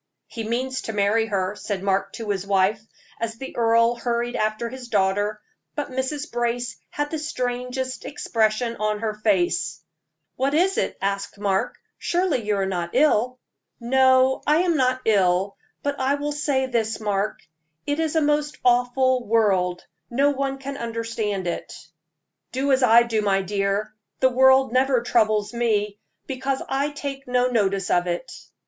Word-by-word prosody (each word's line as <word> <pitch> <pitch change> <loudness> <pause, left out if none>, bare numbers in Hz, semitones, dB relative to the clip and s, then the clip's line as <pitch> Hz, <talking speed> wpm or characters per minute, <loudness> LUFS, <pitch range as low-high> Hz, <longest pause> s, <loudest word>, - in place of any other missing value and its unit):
"He 225 - -6
means 255 +4 -2
to 225 - -5
marry 210 +2 +2
her," 195 -1 -1
said 200 -2 -4
Mark 195 0 0
to 220 -3 -4
his 195 -1 -3
wife, 200 +2 +2 0.4
as 225 -1 -3
the 265 +4 -8
earl 230 0 +4
hurried 240 0 -1
after 215 +2 -1
his 255 +1 -8
daughter; 205 0 +1 0.4
but 295 -3 -3
Mrs. 265 +3 -3
Brace 240 0 -1
had 290 -4 -3
the 315 - -2
strangest 255 -2 -3
expression 230 -2 0
on 215 0 -1
her 220 -1 -1
face. 190 -7 0 0.6
"What 275 +3 +1
is 375 +4 +2
it?" - - -2
Mark - - -12 0.7
asked. - - -26 0.2
"Surely 350 -8 0
you 210 0 0
are 195 -1 0
not 175 -3 -2
ill?" 255 -4 +3 0.4
"No, 260 +1 +4
I 305 +4 +4
am 345 -2 +1
not 255 -2 +1
ill; 195 -2 +2 0.3
but 285 0 -2
I 265 +2 +2
will 290 +1 -3
say 290 -2 0
this, 225 -3 -1
Mark, 210 0 -1 0.5
it 290 +2 -1
is 320 -1 -1
a 320 - +4
most 295 0 0
awful 250 +1 +3
world 190 -5 +2 0.2
no 275 +4 +3
one 275 -1 -2
can 275 +1 -6
understand 230 -4 -3
it." 175 - -4 0.8
"Do 270 +2 0
as 265 0 +3
I 235 -1 +7
do, 225 -2 0
my 195 -2 +1
dear; 200 +2 -1 0.3
the 260 - +4
world 265 0 +5
never 255 -1 +3
troubles 215 -3 +1
me, 210 -3 0 0.3
because 265 0 -2
I 275 +2 0
take 280 -2 -6
no 250 0 +2
notice 195 -5 +1
of 175 0 +2
it." 175 +8 -3
235 Hz, 160 wpm, -23 LUFS, 210-265 Hz, 0.8 s, I